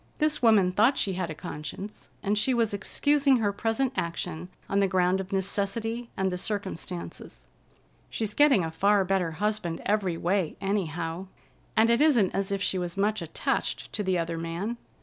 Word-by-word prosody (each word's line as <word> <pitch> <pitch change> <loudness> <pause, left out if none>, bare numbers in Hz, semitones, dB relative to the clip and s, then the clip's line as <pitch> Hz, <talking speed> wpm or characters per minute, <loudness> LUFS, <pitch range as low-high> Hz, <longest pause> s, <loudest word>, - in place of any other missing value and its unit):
This 305 -1 +1
woman 215 -6 +5
thought 225 +9 +3
she 195 - +1
had 180 -2 -3
a 155 - -5
conscience, 155 +8 -7
and 205 +1 +1
she 230 +5 +1
was 230 -3 +1
excusing 280 +6 +2
her 205 -3 0
present 225 +5 0
action 170 0 -3 0.2
on 200 - +1
the 200 - +3
ground 185 0 +2
of 190 - -9
necessity, 215 +5 -1
and 190 -1 +1
the 180 - -2
circumstances. 190 -4 -5 0.6
"She's 215 -2 -3
getting 275 - +5
a 160 - -4
far 200 +3 +3
better 180 -3 0
husband 205 -2 -1
every 195 -5 +1
way, 180 -1 0
anyhow, 175 -3 -2 0.5
and 225 +1 +5
it 235 - +3
isn't 250 -11 +4
as 195 0 -1
if 200 0 -1
she 185 - +1
was 175 0 -4
much 210 +1 +1
attached 165 -1 -2
to 215 - -1
the 190 -2 +1
other 165 -1 -2
man. 170 +8 -3
195 Hz, 175 wpm, -27 LUFS, 180-220 Hz, 0.6 s, woman